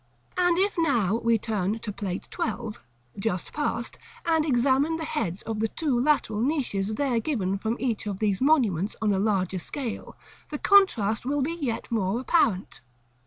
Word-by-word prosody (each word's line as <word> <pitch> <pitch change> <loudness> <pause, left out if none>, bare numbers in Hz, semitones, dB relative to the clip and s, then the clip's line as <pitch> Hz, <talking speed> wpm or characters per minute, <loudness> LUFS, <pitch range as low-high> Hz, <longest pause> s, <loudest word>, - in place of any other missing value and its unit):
And 355 -1 +3
if 395 -1 +1
now 230 - +2
we 230 0 +2
turn 210 -1 -1
to 215 -2 -5
Plate 195 -2 -4
XII., 220 -1 -3 0.4
just 195 -4 -2
passed, 245 -5 -2 0.3
and 325 -2 +3
examine 275 +3 +2
the 320 - -4
heads 205 - -3
of 220 -1 -4
the 225 - +2
two 275 0 -1
lateral 250 -6 +1
niches 230 -7 0
there 255 -2 +1
given 215 -8 -1
from 225 +3 -1
each 230 -4 -1
of 200 -2 -3
these 205 -1 0
monuments 225 - +2
on 215 -2 +2
a 190 - +1
larger 190 -3 0
scale, 235 - -6 0.3
the 295 - -3
contrast 265 - +4
will 280 +2 0
be 320 +5 -1
yet 275 -11 -3
more 215 0 0
apparent. 235 - +1
230 Hz, 165 wpm, -26 LUFS, 205-290 Hz, 0.4 s, contrast